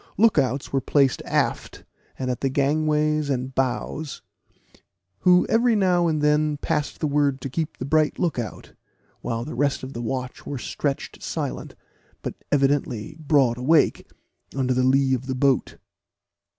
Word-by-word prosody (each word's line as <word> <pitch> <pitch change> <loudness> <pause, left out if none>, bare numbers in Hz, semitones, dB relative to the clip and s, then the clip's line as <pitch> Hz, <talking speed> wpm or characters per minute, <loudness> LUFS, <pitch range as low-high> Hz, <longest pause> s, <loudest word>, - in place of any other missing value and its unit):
Look 225 0 +5
outs 135 +2 -1
were 135 - +2
placed 135 -1 +2
aft, - - -1 0.3
and 130 -1 -2
at 125 - -4
the 135 - +1
gangways 150 +2 +1
and 130 -1 -2
bows, 135 +3 -2 1.0
who 180 0 +5
every 230 0 +3
now 180 -4 +3
and 155 -2 0
then 150 0 +2
passed 150 0 -2
the - - -1
word 145 -2 +1
to 135 - -5
keep 160 +2 -3
a 130 - -3
bright 155 +1 +2
look 170 -8 0
out, 115 - -7 0.5
while 115 0 -3
the 155 - -6
rest 140 -2 0
of 130 +1 -7
the 120 - -5
watch 125 +2 -4
were 140 - -5
stretched 140 +2 -4
silent, - - -4 0.5
but - - -3 0.2
evidently 135 -4 0
broad 140 -6 +2
awake, 150 +4 +2 0.5
under 130 -1 +1
the 130 - +1
lee 130 +1 +3
of 130 0 -2
the 130 - -2
boat. 135 0 +1
140 Hz, 160 wpm, -24 LUFS, 130-155 Hz, 1.0 s, Look